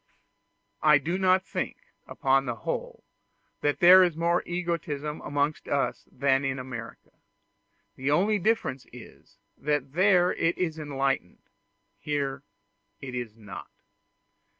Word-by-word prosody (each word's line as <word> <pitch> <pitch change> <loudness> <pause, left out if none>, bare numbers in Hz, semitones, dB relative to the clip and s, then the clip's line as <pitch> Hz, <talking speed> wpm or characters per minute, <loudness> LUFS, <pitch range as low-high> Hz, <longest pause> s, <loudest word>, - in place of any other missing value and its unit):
I 150 -1 +6
do 170 +6 -2
not 185 0 +3
think - - -4 0.3
upon 135 0 +1
the 120 - -2
whole 110 - -5 0.6
that 145 0 0
there 180 +2 +9
is 175 -3 0
more 170 +1 +2
egotism 170 -4 -3
amongst 145 +1 -1
us 140 -1 -1
than 135 +1 +1
in 135 0 -1
America; 125 -3 -8 0.8
the 130 +2 -2
only 200 +8 +2
difference 185 - -1
is, 120 -1 -14 0.2
that 145 -2 -1
there 180 0 +4
it 165 +1 0
is 160 -3 -2
enlightened 135 -9 -2 0.6
here 140 -2 -2 0.6
it 130 -2 -8
is 120 -3 -5
not. 105 -3 -10
145 Hz, 125 wpm, -27 LUFS, 135-175 Hz, 0.8 s, there